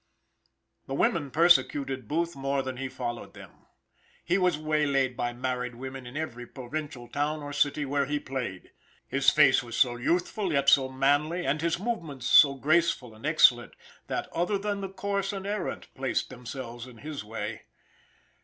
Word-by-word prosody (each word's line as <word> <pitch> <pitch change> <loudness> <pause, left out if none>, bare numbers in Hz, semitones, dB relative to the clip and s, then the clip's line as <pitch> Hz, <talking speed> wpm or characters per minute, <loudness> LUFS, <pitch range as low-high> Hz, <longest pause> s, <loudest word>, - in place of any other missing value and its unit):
The 135 - -3
women 145 0 +1
persecuted 140 -5 +3
Booth 170 +4 -1
more 135 0 -1
than 130 -1 -5
he 135 +1 -4
followed 120 -2 -5
them. - - -14 0.6
He 180 +4 +2
was 180 -4 +2
waylaid 145 -4 +1
by 120 0 -1
married 125 0 -3
women 130 0 -7
in 125 +4 -7
every 125 -6 -5
provincial 135 -1 -6
town 145 +4 -2
or 145 0 -6
city 145 0 +1
where 140 0 0
he 145 +1 -1
played. 125 -10 -5 0.4
His - - +4
face - - +5
was 120 -1 -6
so 120 -2 +3
youthful, 175 - 0
yet 140 -1 +4
so 135 -2 +5
manly, 145 +6 +1
and 150 +2 0
his 170 0 +1
movements 170 - -4
so 140 +1 +7
graceful 155 -4 +1
and 110 +7 -6
excellent, 125 -6 +4 0.3
that - - -3
other 180 +5 0
than 200 0 -3
the 195 - -4
coarse 200 +1 -2
and 195 -1 -6
errant 205 -2 -4
placed 130 0 -2
themselves 125 -1 -7
in 125 -2 -13
his 150 0 -6
way. 105 0 -6
140 Hz, 165 wpm, -28 LUFS, 125-165 Hz, 0.6 s, so